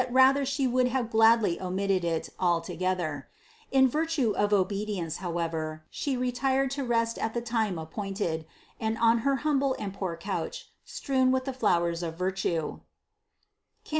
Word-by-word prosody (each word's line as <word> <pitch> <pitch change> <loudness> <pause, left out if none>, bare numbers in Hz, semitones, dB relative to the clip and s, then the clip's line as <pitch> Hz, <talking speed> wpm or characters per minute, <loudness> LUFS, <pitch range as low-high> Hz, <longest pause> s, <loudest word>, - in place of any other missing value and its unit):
352), 260 +2 +5
yet 275 - -1
She 275 0 0
would 250 0 +2
have 250 -2 -1
gladly 225 -5 +4
omitted 190 0 0
it 165 -1 -1
altogether; 175 -3 -1 0.4
in 265 -1 +5
virtue 300 -3 0
of 205 0 0
obedience 195 -4 0
however, 165 -3 -3
She 275 -3 -2
retired 260 +2 0
to 275 0 -2
rest 230 -2 0
at 225 +1 -2
the 235 - 0
time 225 -6 -1
appointed, 165 -1 -3 0.3
and 220 0 -1
on 230 0 +4
her 275 +4 +1
humble 275 -3 +2
and 200 -2 -5
poor 185 -4 -4
couch, 195 +4 -5
strewn 270 - +1
with 260 0 0
the 270 - -3
flowers 170 -8 +1
of 165 -1 -4
virtue 180 -3 -1 1.0
(Cant. - - -17
215 Hz, 155 wpm, -28 LUFS, 175-255 Hz, 1.0 s, 352